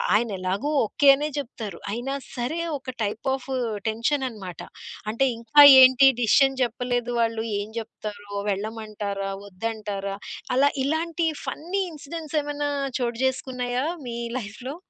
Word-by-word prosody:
ఆయనేలాగో 200 +2 -1 0.2
okay 280 +6 +1
అనే 295 +2 -2
చెప్తారు. 225 -9 -5
అయినా 240 +5 -3 0.2
సరే 255 +7 -2 0.2
ఒక 260 -1 -7
టైప్ 210 +5 -3
ఆఫ్ 265 -2 -5 0.4
టెన్షన్ 230 +6 0
అన్నమాట. 190 -8 -8 0.5
అంటే 230 +5 +2
ఇంకా 235 +6 +6 0.2
ఏంటి 260 +1 +8
డెసిషన్ 270 +3 +4
చెప్పలేదు 245 0 -1
వాళ్ళు. 225 -1 0 0.2
ఏం 205 - -5
జెప్తారో? 210 -2 -8 0.2
వెళ్ళమంటారా? 205 -1 -3 0.2
వద్దంటారా? 200 -1 -4 0.4
అలా 280 +2 +5 0.2
ఇలాంటి 325 +2 0 0.2
ఫన్నీ 360 +6 -2
ఇన్సిడెంట్స్ 310 +1 -6
ఏమన్నా 290 0 -2 0.3
చోటు 235 -1 -2
చేసుకున్నాయా 255 -1 -1 0.2
మీ 235 0 -4 0.2
లైఫ్‌లో? 245 +5 -7
240 Hz, 120 wpm, -25 LUFS, 215-275 Hz, 0.5 s, ఏంటి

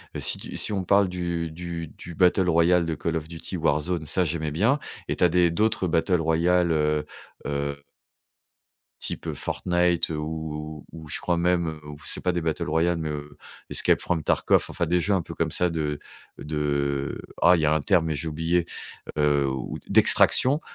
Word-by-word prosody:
heu, - - -3
si - - 0
tu - - -7
si - - 0
on 95 -2 -1
parle 100 +2 +4
du 85 -2 -3
du 85 0 -6
du 85 +3 -11
battle 90 +1 +3
royale 85 +1 +4
de 80 - -2
Call 80 +2 -2
of 80 -1 -3
Duty 85 +3 -7
Warzone, 80 0 0
ça, 90 +4 +1
j'aimais 80 -1 -2
bien 110 - +2 0.3
et - - -1
tu - - -1
as 90 - +6
des 90 +1 +3
d'autres 105 +1 +1
battles 80 +2 +2
royales, 85 +2 +2
heu 75 -1 +1 0.4
heu 70 0 -2 1.3
type - - -3
Fortnite, 90 -1 0
heu, 80 - -2
ou 75 -1 -5
ou 80 - -10
ou - - -12
je - - -4
crois 85 - 0
même, 85 0 +1
heu, 80 -1 -6
ou 75 0 -9
c'est - - -3
pas 90 - +1
des 85 - -1
battles 80 -1 -2
royales, 85 +2 +2
mais, 80 -2 -3
heu, 75 -1 -7 0.3
Escape - - +2
from 85 -2 -1
Tarkov, - - +2
enfin, 85 - -1
des 90 +2 +2
jeux 100 +5 0
un 95 - +3
peu - - -8
comme - - -1
ça 90 - +1
de 75 -3 -2 0.4
de 70 -2 -2 0.2
ah, 90 +1 +7
il - - -1
y 80 - +2
a 75 - +3
un 80 - 0
terme, 85 -1 +3
mais 80 - -1
j'ai 75 +3 -4
oublié, 80 +2 0 0.5
heu, 75 -1 +3
ou 65 -1 -4
de - - -19
d'extraction, 140 +4 +5
80 Hz, 205 wpm, -25 LUFS, 75-90 Hz, 1.3 s, ah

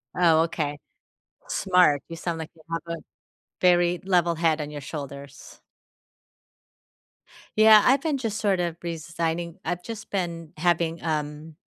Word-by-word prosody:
Oh, 165 -3 +5
okay. 150 -3 -2 0.7
Smart. 180 -7 +3
You 165 - -7
sound 165 -1 -3
like 160 - -6
you 160 - -19
have 165 - -1 0.2
a - - -13 0.6
very 175 -1 +4
level 175 -3 +2
head 165 -1 +2
on 150 0 -4
your 145 - -6
shoulders. 140 -1 -9 2.0
Yeah, 215 -1 +8
I've 270 +2 +4
been 305 -3 0
just, 225 -5 -3
sort 195 -3 +1
of, 170 -1 -2
resigning 170 0 -3
I've 175 +1 -3
just 225 0 -8
been 170 -4 -3
having, 170 0 +1
um 150 0 -3
170 Hz, 140 wpm, -25 LUFS, 155-180 Hz, 2.0 s, Yeah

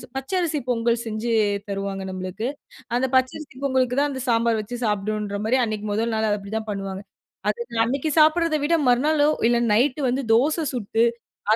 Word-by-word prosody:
பச்ச 270 +6 -5
அரிசி 320 -4 0
பொங்கல் 235 0 +1
செஞ்சு 220 +2 -3 0.4
தருவாங்க 195 -1 -3
நம்மளுக்கு. 185 +5 -4 0.5
அந்த 255 +2 +2
பச்சரிசி 260 +2 0
பொங்கலுக்கு 260 -2 +1
தான் 290 0 +2
அந்த 260 -1 -5
சாம்பார் 230 -1 +2
வச்சு 235 +4 -7
சாப்டுன்ற 210 0 -1
மாரி 245 +4 +2
அன்னைக்கு 215 -1 -4
1ல் 225 +2 0
நாள் 220 0 +1
அது 205 - +1
அப்டிதான் 215 +2 -4
பண்ணுவாங்க. 195 -1 -4 0.5
அது 475 - -2 0.2
அன்னைக்கு 275 +6 -1
சாப்டுறத 315 +1 +4
விட, 330 +3 +1
மறுநாளோ 290 +4 +3 0.2
இல்ல 240 0 +3 0.2
நைட்‌டு 260 +6 +2
வந்து 260 +3 0
தோச 305 +7 +2
சுட்டு 225 -1 0 0.5
அதுல - - +4
235 Hz, 165 wpm, -23 LUFS, 210-275 Hz, 0.5 s, சாப்டுறத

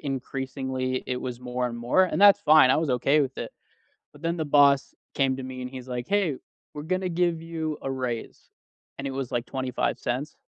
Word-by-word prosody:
increasingly, 130 -1 -3
it 125 - -2
was 125 -2 -5
more 125 0 -2
and 120 - -6
more, 125 +11 +3
and 185 - -2
that's 205 0 +7
fine 155 -6 +6
I - - +4
was 155 -3 0
okay 135 +5 +3
with 135 -2 -2
it. - - -5 0.6
But 145 +2 -17
then 170 +1 -1
the 160 - -1
boss 140 -1 +4 0.2
came 135 -1 +1
to 135 - -6
me, 130 -1 -6
and 125 - -5
he's 130 -1 -9
like, 125 -1 -4
"Hey. 195 -9 +1 0.4
We're 150 - -6
gonna 185 +3 -1
give 170 -1 0
you 160 -2 -4
a 135 - -3
raise". 125 -3 -5 0.5
And 140 - -4
it - - -2
was, 135 -2 -4
like, 120 0 -1
25¢. 130 +1 -2
135 Hz, 205 wpm, -26 LUFS, 125-155 Hz, 0.6 s, that's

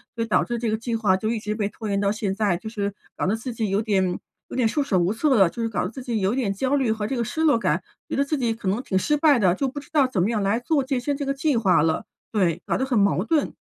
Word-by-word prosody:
所 230 - -1
以 - - -4
导 215 - +3
致 240 - -3
这 230 -1 -1
个 220 - 0
计 230 +1 -3
划 205 -4 +2
就 215 +3 -2
一 230 -1 -1
直 210 0 -3
被 205 -2 -1
拖 215 +1 -7
延 200 0 +1
到 200 - +1
现 210 -3 -2
在， 200 -3 +1
就 220 +5 -6
是 205 -3 -3 0.2
搞 - - -1
得 200 - +2
自 235 +2 -5
己 220 -2 -2
有 195 +3 +1
点 190 -5 +1 0.3
有 - - -8
点 255 - +2
束 290 +6 0
手 215 -9 +1
无 175 +2 +2
策 270 +4 +2
了， 195 -6 +5
就 235 - -6
是 225 - 0
搞 215 - -2
得 180 - -2
自 260 - -8
己 235 -4 -2
有 190 +3 +1
点 240 -6 0
焦 260 +7 0
虑 265 -4 +1
和 215 -1 -2
这 260 +3 -2
个 235 - 0
失 315 - -3
落 295 -7 +4
感， - - 0 0.3
觉 - - -2
得 280 - +2
自 295 +1 -1
己 235 -3 0
可 220 -4 -7
能 210 +6 0
挺 190 - -1
失 295 +10 +1
败 290 -4 +4
的， 185 -5 +4
就 275 - -1
不 285 +3 -5
知 - - -18
道 290 -4 +4
怎 200 -9 0
么 205 - +1
样 225 -3 0
来 200 +3 +1
做 285 +1 +1
健 260 -2 -1
身 280 +2 -1
这 285 - -3
个 275 - 0
计 275 -1 +1
划 190 -8 +4
了， 160 0 0 0.3
对， 185 -7 +1
搞 - - 0
得 265 - 0
很 260 -3 0
矛 200 -2 +3
盾。 305 +3 +1
225 Hz, 350 characters per minute, -24 LUFS, 200-265 Hz, 0.3 s, 了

